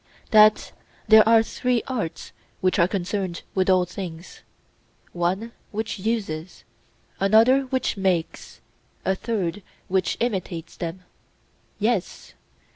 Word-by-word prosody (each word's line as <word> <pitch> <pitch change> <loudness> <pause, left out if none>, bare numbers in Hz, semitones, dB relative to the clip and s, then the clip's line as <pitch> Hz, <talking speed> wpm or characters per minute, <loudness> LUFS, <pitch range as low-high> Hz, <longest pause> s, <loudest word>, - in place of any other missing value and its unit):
That 215 -1 +5 0.4
there 220 0 +7
are 225 -1 +6
three 245 +1 -1
arts 220 -11 -4 0.3
which 185 0 +1
are 170 - +5
concerned 185 -1 -3
with 190 0 +1
all 185 -1 +4
things: 180 -1 -8 0.7
one 185 +6 -2 0.2
which 220 0 -4
uses, 190 -6 -3 0.6
another 230 +7 +4
which 260 -4 -1
makes, 185 -4 -2 0.4
a 190 - +2
third 200 -2 -3 0.3
which 190 0 0
imitates 185 -7 -3
them? 175 +1 -6 0.7
Yes. 215 -3 -2
195 Hz, 110 wpm, -24 LUFS, 180-225 Hz, 0.7 s, there